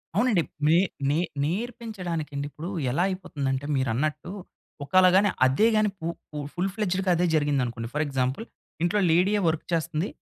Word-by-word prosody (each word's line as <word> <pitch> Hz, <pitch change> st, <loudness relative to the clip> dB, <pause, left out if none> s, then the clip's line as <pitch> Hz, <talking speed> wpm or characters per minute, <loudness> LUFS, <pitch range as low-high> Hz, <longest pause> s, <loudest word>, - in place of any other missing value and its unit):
అవునండి. 210 Hz, -3 st, +3 dB, 0.3 s
నే 160 Hz, +2 st, +5 dB, 0.3 s
నే 145 Hz, -, +2 dB, 0.3 s
నేర్పించడానికి 185 Hz, -3 st, -3 dB
అండి. 140 Hz, 0 st, -2 dB
ఇప్పుడు 160 Hz, +4 st, -7 dB, 0.2 s
ఎలా 170 Hz, +8 st, +1 dB
అయిపోతుందంటే, 145 Hz, -8 st, -3 dB
మీరన్నట్టు 140 Hz, +6 st, -1 dB, 0.5 s
ఒకళ 185 Hz, +7 st, +4 dB
గాని 200 Hz, +2 st, +5 dB, 0.2 s
అదే 135 Hz, +12 st, +4 dB
గాని 215 Hz, 0 st, +3 dB
పు 160 Hz, -, -6 dB, 0.3 s
పు 150 Hz, -, -7 dB, 0.2 s
ఫుల్ 180 Hz, +2 st, -1 dB
ఫ్లెడ్జ్‌గా 190 Hz, -2 st, 0 dB
అదే 175 Hz, +1 st, +2 dB
జరిగింది 145 Hz, -3 st, +2 dB
అనుకోండి. 115 Hz, -1 st, -5 dB
ఫర్ 150 Hz, +1 st, +1 dB
ఎగ్జాంపుల్ 135 Hz, -, -1 dB, 0.4 s
ఇంట్లో 175 Hz, +4 st, +2 dB
లేడియే 190 Hz, +5 st, +3 dB
వర్క్ 160 Hz, -1 st, 0 dB
చేస్తుంది. 165 Hz, +2 st, 0 dB
165 Hz, 155 wpm, -26 LUFS, 145-190 Hz, 0.5 s, నే